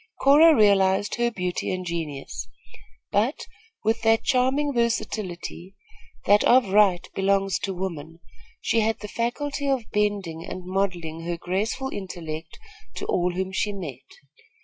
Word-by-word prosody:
Cora 305 +4 +7
realized 200 -2 +3
her 240 0 +2
beauty 180 -5 -3
and 185 0 -3
genius; 150 - -5 0.6
but, 220 +8 0 0.4
with 225 +1 +1
that 225 0 +3
charming 270 +3 +2
versatility, 195 -6 -2 0.5
that 205 +1 +5
of 245 -4 +5
right 190 -3 +4
belongs 195 -1 +1
to 195 - -3
woman, 165 -3 -5 0.4
she 230 - +1
had 220 0 +1
the 210 - -5
faculty 280 +6 -2
of 255 -5 -1
bending 200 -6 -1
and 185 +1 -7
modelling 180 -4 -2
her 170 0 -2
graceful 210 +10 -2
intellect 165 -7 -6 0.4
to - - -5
all 180 0 0
whom 190 +1 -2
she 205 +2 -1
met. 140 -9 -7
195 Hz, 135 wpm, -25 LUFS, 175-225 Hz, 0.6 s, Cora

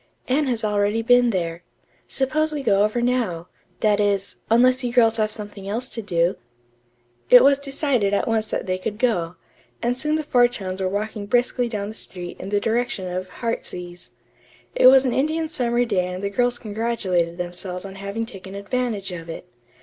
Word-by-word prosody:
Anne 280 +3 +1
has 235 -4 -1
already 210 +2 +1
been 245 +1 +5
there. 170 -4 -2 0.5
Suppose 310 +4 0
we 295 -2 -4
go 200 -4 +3
over 215 +3 0
now; 225 -9 -1 0.3
that 210 -1 +3
is, 200 -1 0
unless 250 +3 +4
you 245 - -1
girls 230 -2 +4
have 215 -1 +1
something 205 -2 -8
else 240 +5 -1
to 230 - -5
do." 175 -3 0 0.9
It 250 0 +9
was 280 0 +5
decided 275 -6 0
at 200 - 0
once 220 -1 0
that - - -2
they 185 -1 -1
could 210 +3 -4
go, 180 -8 0 0.4
and 240 +1 0
soon 300 +4 0
the 310 - -1
four 245 -4 +4
chums 190 -6 -5
were 185 - 0
walking 205 +1 -3
briskly 245 +2 +1
down 205 -3 -3
the - - -7
street 180 -5 -7
in 190 - -6
the 205 0 +1
direction 225 -3 -1
of 185 +1 -4
"Heartsease." 180 - -5 0.6
It - - +6
was 265 +1 +7
an 250 - +1
Indian 315 +3 0
summer 245 -4 0
day 190 -6 0
and 180 +1 -6
the 200 - -1
girls 245 +3 +1
congratulated 205 -7 -1
themselves 180 +1 -5
on 195 - -8
having 200 +3 -4
taken 195 -2 -10
advantage 205 -1 -2
of 165 -2 -7
it. 165 - -7
215 Hz, 190 wpm, -23 LUFS, 190-245 Hz, 0.9 s, It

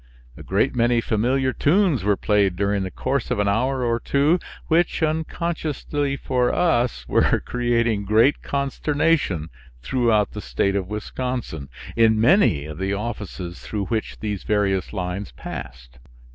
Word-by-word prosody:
A - - -11
great 100 +8 0
many 120 0 +3
familiar 130 +4 +1
tunes 165 - +2
were 100 -1 +2
played 100 -3 +2
during 100 +1 0
the 95 - -3
course 130 +6 -2
of 125 - 0
an 105 0 +1
hour 125 +6 +1
or 115 0 +1
two 145 +8 +2 0.3
which, 165 0 +1
unconsciously 155 -3 -2
for 125 -2 0
us, 120 - +1
were - - +3
creating 115 -4 0
great 110 +7 +3
consternation 140 - 0 0.3
throughout 115 - +2
the 105 - -6
State 100 -1 0
of 95 -2 -1
Wisconsin, 105 - -4 0.3
in 110 -1 +4
many 115 - +4
of 75 +1 -8
the 95 +1 -1
offices 100 -5 -5
through 105 -2 -3
which 110 +2 -3
these 105 -3 -3
various 100 -3 0
lines 95 0 -4
passed. 60 0 -9
115 Hz, 145 wpm, -23 LUFS, 100-135 Hz, 0.3 s, in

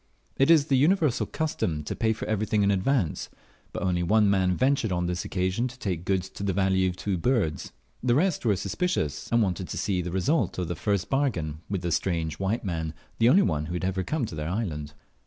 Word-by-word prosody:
It 135 +2 +3
is 160 -4 +6
the 140 -3 +2
universal 155 -2 +2
custom 90 - -2
to - - -4
pay 110 -1 +1
for 110 - -4
everything 110 -1 +1
in 100 - +3
advance; 100 - 0 0.4
but - - -4
only 90 -2 +1
one 105 +3 +3
man 95 -2 +2
ventured 130 -5 +2
on 90 -1 0
this 90 0 -2
occasion 95 +6 -1
to 125 0 -11
take 90 -8 -3
goods 95 -1 0
to - - -10
the 100 -1 0
value 95 -1 +2
of 90 - -5
two 95 -3 -2
birds. 105 -8 0 0.3
The 120 -1 +2
rest 175 +2 +1
were 110 -4 +3
suspicious, 100 - -2
and 115 -1 +4
wanted 95 -2 -2
to - - -5
see 95 -3 0
the 90 - -4
result 95 - 0
of 90 -2 -2
the 85 - -2
first 100 +3 -1
bargain 90 - -1
with 95 -3 -2
the 85 - -1
strange 80 -3 -1
white 100 +4 -1
man, 80 -3 -3 0.2
the 115 +1 +5
only 190 +9 +6
one 75 -2 -1
who 85 - -5
had 90 +1 -2
ever 95 0 -1
come 145 - -1
to 105 - -8
their 75 +1 -3
island. 80 -8 -3
95 Hz, 225 wpm, -27 LUFS, 90-120 Hz, 0.4 s, is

